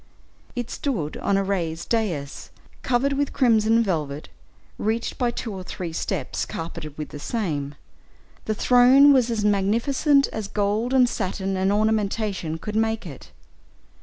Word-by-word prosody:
It 245 -1 -4
stood 190 - -3
on 200 - +1
a 195 - +1
raised 175 -4 -3
dais, 175 -12 -2 0.3
covered 260 +3 +1
with 285 0 -1
crimson 230 -3 +3
velvet, 150 -7 -3 0.5
reached 220 +2 -2
by 245 - +2
two 235 -2 -5
or 190 - -6
three 180 -2 -6
steps 165 -4 -2
carpeted 155 -2 -7
with 150 - -5
the 145 - -8
same; 145 -8 -3 0.7
the 215 - -1
throne 255 +5 +6
was 250 -3 +3
as 220 -3 -1
magnificent 235 +8 +2
as 215 -2 -5
gold, 210 +4 -1
and 260 -2 +5
satin, 195 -3 -2
and 190 +1 +1
ornamentation 210 -5 0
could 210 +6 -6
make 220 -1 0
it. 145 -6 -10
210 Hz, 145 wpm, -24 LUFS, 180-235 Hz, 0.7 s, throne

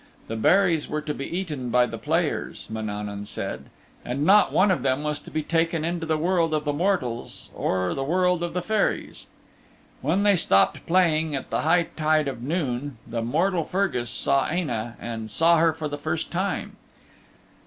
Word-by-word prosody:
The 115 - -4
berries 165 - +3
were 155 - -2
to 150 0 -3
be 140 - -5
eaten 155 -8 -4
by 125 +1 +4
the 115 -2 -6
players, 160 +6 -1
Mananaun 105 -2 -4
said, 70 -7 -5 0.4
and 135 +4 -2
not 205 +4 +6
one 195 +1 +4
of 175 - +1
them 130 +2 0
was 150 -1 -2
to - - -13
be 155 - -2
taken 165 0 0
into 170 -1 -2
the 160 -1 +1
world 165 -1 +1
of 150 0 -2
the 145 - 0
mortals 145 -8 -2
or 90 -1 -1
the 135 - -2
world 180 +3 +2
of 175 0 -3
the 180 - -1
Fairies. 215 +1 -1 0.7
When 170 +9 +1
they 205 -1 +5
stopped 95 - +2
playing 160 -4 +2
at 135 - -6
the - - 0
high 170 +3 +3
tide 155 -1 +2
of 125 -4 -4
noon 140 -3 -2
the 115 0 -3
mortal 165 +9 +1
Fergus 175 - -1
saw 140 +2 +1
Aine' 120 -10 -2
and 110 -2 -5
saw 165 +9 +4
her 165 0 +4
for 155 -1 -4
the 145 0 -5
first 155 +2 -3
time. 190 +3 -2
155 Hz, 185 wpm, -25 LUFS, 125-175 Hz, 0.7 s, not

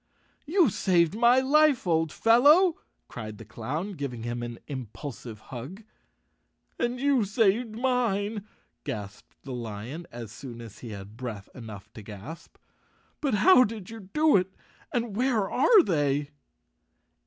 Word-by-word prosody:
"You 330 - +4
saved 175 -3 +2
my 240 +3 +5
life, 290 -1 +4
old 160 -3 +1
fellow," 295 - +5 0.3
cried 110 -3 -8
the 115 - -11
clown, 135 - -4
giving 140 - -5
him 120 0 -3
an 120 -1 -5
impulsive 125 -3 -7
hug. 145 - -7 1.0
"And 240 +1 -1
you 275 -3 +3
saved 215 +2 +1
mine," 225 -4 0 0.4
gasped 105 0 -7
the 135 - -7
lion, 120 +7 -6
as 115 -3 -8
soon 120 0 -9
as 115 -3 -11
he 120 - -8
had 100 +1 -9
breath 115 -6 -6
enough 110 -6 -10
to 110 - -9
gasp. 105 +10 -10 0.3
" - - -38
But 275 -7 +1
how 255 - +7
did 215 -3 -5
you 220 -5 -10
do 305 -1 +4
it 185 0 -2 0.4
and 235 -4 -2
where 235 -4 +1
are 365 - +5
they?" 145 - 0
175 Hz, 140 wpm, -27 LUFS, -, 1.0 s, how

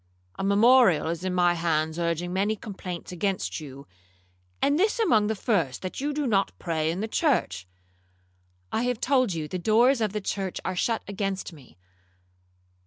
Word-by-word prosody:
A - - -2
memorial 200 -4 +5
is 170 +1 -4
in 185 -1 -2
my 175 -1 +4
hands 160 -1 -1
urging 170 +1 -1
many 200 +3 +1
complaints 190 -5 -7
against 190 +1 -2
you, 140 -2 -10 0.7
and 285 +3 +2
this 420 +4 +2
among 225 - +3
the 220 - -1
first, 175 - -1
that 185 +7 -5
you 290 +2 -1
do 295 0 -2
not 200 -5 +1
pray 160 -2 -1
in 175 +4 -2
the 220 - -2
church.'—'I 90 - -4
have 245 -2 -1
told 255 -5 +2
you 155 -2 -3
the 185 +3 -4
doors 230 +6 +3
of 215 -2 +1
the 210 - -2
church 195 -2 -3
are 185 - -2
shut 225 +5 0
against 195 -2 -3
me. 130 - -17
185 Hz, 170 wpm, -26 LUFS, 160-220 Hz, 0.7 s, memorial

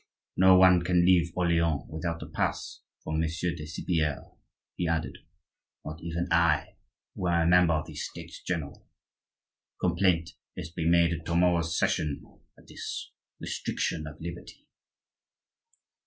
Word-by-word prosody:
No 95 0 +7
one 90 -1 +6
can 90 0 +3
leave 85 -2 +4
Orleans 85 -4 +1
without 80 +1 -4
a - - -7
pass - - -3 0.2
from 80 0 -2
Monsieur 80 +2 -1
de 75 -2 -7
Cypierre," 80 -2 -2 0.4
he 90 - -1
added,—"not 80 -1 -7
even 85 +1 -3
I, 85 -2 +2 0.4
who 90 - -3
am 85 -1 +2
a - - +2
member 90 -1 +5
of 75 0 -2
the - - -10
States - - -7
general. 80 -6 -5 0.9
Complaint 85 -1 +1 0.2
is 85 -2 -6
to 80 - -26
be 80 - 0
made 85 0 +4
at 85 -1 -5
to 85 - -1
morrow's 85 -2 +2
session 75 -2 0 0.3
of - - -19
this - - -6 0.3
restriction 80 -1 -3
of 75 0 -10
liberty." 85 +1 -9
85 Hz, 140 wpm, -28 LUFS, 80-85 Hz, 0.9 s, No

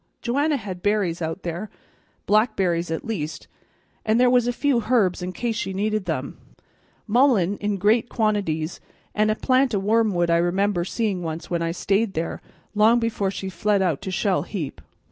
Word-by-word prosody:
Joanna 285 +5 +1
had 190 -6 -7
berries 200 -5 0
out 160 +3 -4
there, 175 +5 -4 0.6
blackberries 190 -6 +2
at 160 - -3
least, 170 -9 -4 0.6
and 220 +2 +2
there 250 0 +5
was 245 -1 +3
a - - +2
few 245 -3 0
herbs 200 -8 +2
in 180 +1 -3
case 230 +3 -2
she 195 -3 -3
needed 210 +1 -1
them. - - -4 0.7
Mullein 220 -5 +3
in 205 -1 -2
great 220 +5 +2
quantities 195 -8 -1 0.3
and 215 0 +2
a 215 - +2
plant 255 -1 +2
o' - - +1
wormwood 200 -4 +2
I 170 - +4
remember 175 +1 +1
seeing 205 -2 -1
once 165 0 -5
when 170 -1 0
I 165 - 0
stayed 195 +4 0
there, 165 +1 -3 0.3
long 220 +3 +5
before 220 -4 -1
she 190 0 -5
fled 200 +1 +1
out 165 -7 0
to - - -5
Shell 185 +1 +1
heap. 165 -10 -5
205 Hz, 175 wpm, -23 LUFS, 175-225 Hz, 0.7 s, there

